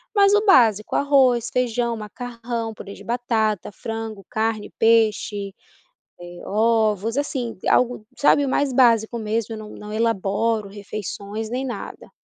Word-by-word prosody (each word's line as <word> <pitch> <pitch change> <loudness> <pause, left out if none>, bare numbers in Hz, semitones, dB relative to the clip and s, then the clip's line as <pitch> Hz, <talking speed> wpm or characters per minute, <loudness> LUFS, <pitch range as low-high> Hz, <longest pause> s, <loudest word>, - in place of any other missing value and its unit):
mas 400 0 +5
o 415 +1 +2
básico 225 - +4
arroz, 260 -5 +3
feijão, 240 -1 0
macarrão, 230 +1 -5
purê 200 0 -9
de - - -13
batata, 225 -5 -1
frango, 225 -1 -6
carne, 220 -1 -1
peixe, 215 -3 +2 0.6
eh, 175 0 -10
ovos 220 +1 +1
assim, 260 -6 -2
algo 245 -3 +2
sabe, 285 0 +4
o - - -2
mais 270 0 +1
básico 235 -2 +3
mesmo, 220 +1 -2
eu 215 - -8
não 215 - -9
não 210 0 -9
elaboro 220 -1 0
refeições 205 +1 -6
nem 255 +3 -2
nada. 235 -6 -7
225 Hz, 135 wpm, -22 LUFS, 210-245 Hz, 0.6 s, mas